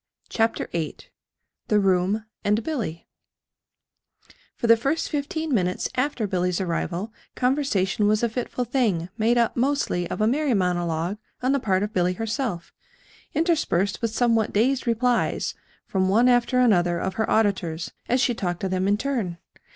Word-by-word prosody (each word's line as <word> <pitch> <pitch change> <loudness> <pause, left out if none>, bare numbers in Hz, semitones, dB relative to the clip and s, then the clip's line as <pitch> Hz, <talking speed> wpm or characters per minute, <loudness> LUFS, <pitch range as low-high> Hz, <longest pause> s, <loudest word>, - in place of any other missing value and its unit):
CHAPTER 225 0 0
VIII 165 -2 -3 0.7
THE 210 - +3
ROOM 195 +2 +1 0.2
AND 210 +2 +1
BILLY 215 - -4 1.5
For - - -4
the 230 0 +7
first 275 +8 -1
fifteen 310 +1 -2
minutes 180 -5 0
after 255 -3 -1
Billy's 180 -2 0
arrival 180 +3 -2 0.2
conversation 250 -7 +1
was 215 +2 +2
a 235 - +2
fitful 245 +2 -3
thing 215 -9 0
made 230 +2 +3
up 235 -1 +2
mostly 250 -9 0
of - - -4
a 215 - +3
merry 270 +2 +2
monologue 175 0 -1 0.2
on 255 - +2
the 280 - +2
part 190 -5 +1
of 210 +1 -4
Billy 180 0 +2
herself, 215 - -3 0.6
interspersed 300 - +1
with 230 - +1
somewhat 230 -1 +1
dazed 255 +5 +1
replies 240 +1 +1 0.3
from 190 -1 0
one 230 +6 +4
after 245 +1 +3
another 175 -8 +3
of 190 +2 -2
her 220 +3 -1
auditors 190 -7 0 0.2
as 250 - +3
she 250 -1 +2
talked 175 -6 -3
to 190 - -1
them 185 +1 0
in 205 +1 +3
turn. 225 -9 -2
215 Hz, 155 wpm, -24 LUFS, 185-250 Hz, 1.5 s, the